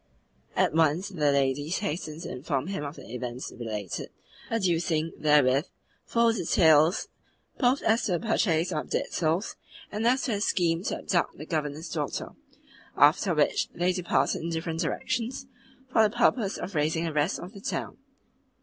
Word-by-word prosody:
At -, -, +2 dB
once 165 Hz, +4 st, +2 dB
the 150 Hz, -7 st, +1 dB
ladies 140 Hz, +4 st, +1 dB
hastened 160 Hz, -4 st, -4 dB
to 170 Hz, -, -6 dB
inform 135 Hz, 0 st, -2 dB
him 190 Hz, -5 st, -4 dB
of 145 Hz, +1 st, -5 dB
the -, -, -12 dB
events 125 Hz, 0 st, -5 dB
related, 105 Hz, -6 st, -5 dB, 0.4 s
adducing 170 Hz, -6 st, 0 dB
therewith 145 Hz, 0 st, +3 dB, 0.4 s
full 235 Hz, -1 st, +3 dB
details 160 Hz, -4 st, +4 dB, 0.5 s
both 255 Hz, +1 st, +2 dB
as 225 Hz, +2 st, +2 dB
to 195 Hz, -, 0 dB
the 175 Hz, -, +1 dB
purchase 180 Hz, -7 st, +1 dB
of 155 Hz, -3 st, -3 dB
dead -, -, -1 dB
souls 165 Hz, +5 st, 0 dB, 0.3 s
and 215 Hz, +2 st, 0 dB
as 260 Hz, +2 st, +3 dB
to 250 Hz, -, -1 dB
the 205 Hz, -2 st, -1 dB
scheme 170 Hz, -5 st, +1 dB
to -, -, -1 dB
abduct 175 Hz, -3 st, -1 dB
the 150 Hz, -, -8 dB
Governor's 155 Hz, 0 st, -3 dB
daughter; 150 Hz, -3 st, -3 dB, 0.7 s
after -, -, +4 dB
which -, -, +2 dB
they 180 Hz, +1 st, +1 dB
departed 180 Hz, -1 st, 0 dB
in 165 Hz, -, -3 dB
different 165 Hz, 0 st, -3 dB
directions, 235 Hz, -, -2 dB, 0.5 s
for 225 Hz, -, +5 dB
the 215 Hz, -, +5 dB
purpose 235 Hz, -4 st, +2 dB
of 190 Hz, -, -6 dB
raising 160 Hz, +1 st, +1 dB
the 165 Hz, -2 st, -2 dB
rest 150 Hz, +4 st, +1 dB
of 180 Hz, +4 st, -9 dB
the 200 Hz, -, -11 dB
town. -, -, -4 dB
165 Hz, 165 wpm, -27 LUFS, 150-195 Hz, 0.7 s, for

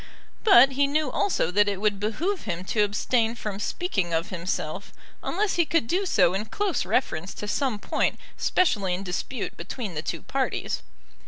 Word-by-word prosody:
But 270 Hz, -, +8 dB
he 280 Hz, +1 st, +2 dB
knew 295 Hz, -1 st, 0 dB
also 265 Hz, -, +1 dB
that 205 Hz, +2 st, +4 dB
it 200 Hz, -2 st, -3 dB
would 205 Hz, -1 st, +1 dB
behove 315 Hz, -, -2 dB
him 180 Hz, -3 st, -3 dB
to 210 Hz, +3 st, 0 dB
abstain 225 Hz, +3 st, +1 dB
from 210 Hz, -4 st, -5 dB
speaking 195 Hz, -, -1 dB
of 165 Hz, +5 st, -1 dB
himself 185 Hz, -2 st, -3 dB, 0.3 s
unless 395 Hz, +2 st, 0 dB
he 345 Hz, -, +5 dB
could 330 Hz, -7 st, +2 dB
do 375 Hz, +9 st, 0 dB
so 180 Hz, -, +4 dB
in 200 Hz, +3 st, -2 dB
close 400 Hz, -, -1 dB
reference 185 Hz, -8 st, -1 dB
to 210 Hz, -, -5 dB
some 255 Hz, +1 st, 0 dB
point -, -, 0 dB, 0.2 s
specially 205 Hz, -, +2 dB
in 190 Hz, -, -5 dB
dispute 195 Hz, +6 st, -4 dB
between 220 Hz, -8 st, -5 dB
the 155 Hz, -, -3 dB
two -, -, -4 dB
parties. -, -, -2 dB
215 Hz, 175 wpm, -26 LUFS, 195-290 Hz, 0.3 s, But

